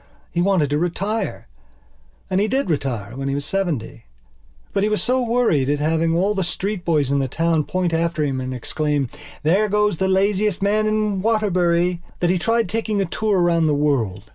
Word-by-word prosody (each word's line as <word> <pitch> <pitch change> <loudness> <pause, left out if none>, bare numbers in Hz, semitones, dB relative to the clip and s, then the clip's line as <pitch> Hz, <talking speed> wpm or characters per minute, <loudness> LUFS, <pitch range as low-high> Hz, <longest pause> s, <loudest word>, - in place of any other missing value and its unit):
He 175 - 0
wanted 175 -6 +2
to 145 - +1
retire. 195 +5 -2 0.8
And 190 +1 +1
he 210 - +2
did 265 -4 0
retire 120 -7 -3
when 135 +1 -4
he 135 - -1
was 140 0 -3
seventy. 170 - -3 0.7
But 195 - +1
he 210 - +2
was 210 - 0
so 255 +1 +1
worried 230 - +1
at 145 - +2
having 160 +2 +1
all 195 +5 +2
the 195 -2 -1
street 190 +2 -3
boys 150 -6 +1
in 140 - +2
the 135 - 0
town 165 +2 0
point 180 -2 -1
after 165 -1 0
him 135 -3 -1
and 130 0 -4
exclaim: 145 +2 -1 0.3
"There 195 +7 +3
goes 210 -3 +1
the 190 - 0
laziest 195 +1 +1
man 210 +2 +1
in 215 -2 0
Waterbury!" 180 -5 +1 0.2
that 175 0 +2
he 185 - +1
tried 230 +3 +1
taking 220 +1 -1
a 195 - +1
tour 205 +2 0
round 170 -2 +3
the 150 - +2
world. 140 -10 0
175 Hz, 195 wpm, -21 LUFS, 150-205 Hz, 0.8 s, There